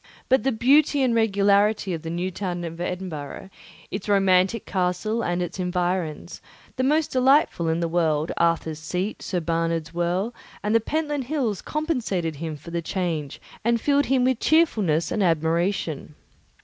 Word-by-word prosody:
But 260 +1 +4
the 270 - +1
beauty 275 +4 +3
and 250 -2 +2
regularity 205 -2 +2
of 165 - -4
the 165 - -6
new 175 +3 -2
town 175 -2 -4
of 165 0 -6
Edinburgh, 180 -1 -5 0.4
its 195 +1 -5
romantic 195 +2 +3
castle 185 +5 -1
and 175 +1 0
its 175 - -6
environs, 180 -3 -2 0.3
the 255 - -1
most 300 +3 +2
delightful 260 - +3
in 165 +1 0
the 170 - 0
world, 160 -2 +1
Arthur's 165 -2 +1
Seat, 180 +6 -3
St. 180 -4 -3
Bernard's 165 -1 -1
Well, 175 +6 -1 0.3
and 210 +1 0
the 230 - +5
Pentland 295 +2 -2
Hills, 245 - -1
compensated 225 - -2
him 160 0 -5
for 165 +4 -11
the 170 0 -2
change 165 -5 -3 0.2
and 235 +1 +2
filled 285 +3 +2
him 260 -2 +2
with 255 -2 +1
cheerfulness 210 - +2
and 215 - 0
admiration. 165 -2 0
185 Hz, 160 wpm, -24 LUFS, 170-230 Hz, 0.4 s, the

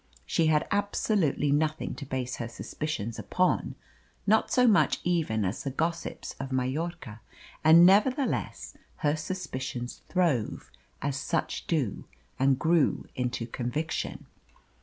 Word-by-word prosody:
She 165 - +2
had 155 -1 +2
absolutely 200 -7 +1
nothing 155 +2 0
to 140 - -8
base 130 -2 -3
her 120 - -4
suspicions 115 -2 -4
upon, 185 0 0 0.5
not 220 +2 +3
so 250 - +4
much 215 -4 +4
even 155 - +1
as 95 +4 -2
the 140 - -3
gossips 165 +5 -3
of 135 0 -5
Majorca. 130 -3 -3 0.4
And 165 +2 +8
nevertheless 255 +9 +2 0.3
her 145 +1 +3
suspicions 130 -7 -5
throve, 165 - 0 0.3
as 140 -1 -1
such - - -2
do, 145 - -1 0.3
and 135 0 +4
grew 160 +1 +2
into 125 -2 -2
conviction. 125 +7 -3
150 Hz, 120 wpm, -28 LUFS, 130-170 Hz, 0.5 s, And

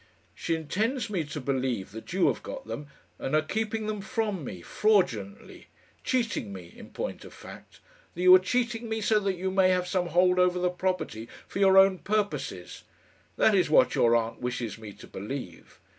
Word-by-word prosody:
"She 165 - -2
intends 215 - -2
me 180 -5 0
to 150 +1 -6
believe 130 -7 -2
that 110 +2 -9
you 185 0 +2
have - - +1
got 270 -1 -8
them, 145 - -6 0.3
and 135 - -1
are 155 - +4
keeping 220 +5 -2
them 210 -1 -3
from 215 - -2
me 90 -9 -7
fraudulently! 125 - 0 0.4
cheating 230 - -1
me, 90 -3 -10
in - - -12
point - - -5
of - - -12
fact - - -13 0.4
that 175 - -3
you 185 0 +9
are 185 - +9
cheating 235 +3 -1
me, 220 0 -1
so 215 0 +2
that 195 -2 -1
you 190 +1 -3
may 190 -1 +4
have 180 -1 +1
some 180 -1 0
hold 180 +2 +3
over 180 0 +3
the 180 0 +1
property 180 -11 -3 0.2
for - - -5
your 195 -1 +5
own 190 -1 +6
purposes. 210 0 -3 0.5
That 220 - +4
is 185 -5 +3
what 155 - +5
your 120 0 +4
aunt 115 0 -1
wishes 120 -3 -4
me 110 -2 -9
to - - -13
believe. 100 -4 -8
180 Hz, 190 wpm, -27 LUFS, 130-210 Hz, 0.5 s, you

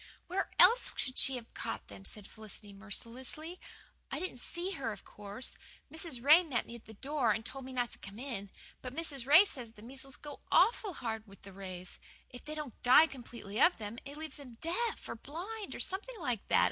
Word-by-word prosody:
"Where 375 +2 -1
else - - +7
could 255 -1 -1
she 265 - +4
have 235 -2 -7
caught 110 - -4
them?" 95 -1 -11
said 210 -2 -5
Felicity 215 -1 -4
mercilessly. 245 - -3 0.5
"I - - -2
didn't 365 -9 -4
see 345 +8 -3
her, 265 - -2
of - - -9
course 205 +5 -5 0.3
Mrs. 320 -7 -1
Ray 305 +5 +9
met 280 -8 0
me - - -9
at 235 - -10
the 220 - -11
door 270 -1 +1
and 220 +1 -1
told 270 +1 -3
me 265 - -7
not 245 -1 0
to - - 0
come 200 +1 -9
in. 235 -6 -4 0.3
But 255 0 -6
Mrs. 285 -6 -1
Ray 310 +8 +10
says 245 - -5
the 210 - -14
measles 265 +2 -3
always 290 -1 -7
go - - -35
awful 440 -4 +5
hard 225 -5 -3
with 195 0 -15
the 195 - -10
Rays 185 -2 -6 0.3
if 245 - -9
they 305 0 -5
don't 300 -6 -6
die 255 +6 +9
completely 235 -7 -5
of 355 - +7
them 215 +2 -5
it 280 +2 -7
leaves 315 0 -4
them 260 -5 -9
deaf 365 +9 -1
or - - -3
half 225 - -13
blind, 390 +8 -5
or - - -6
something 420 +5 -2
like 245 - -1
that. - - +5
255 Hz, 220 wpm, -34 LUFS, 220-315 Hz, 0.5 s, Ray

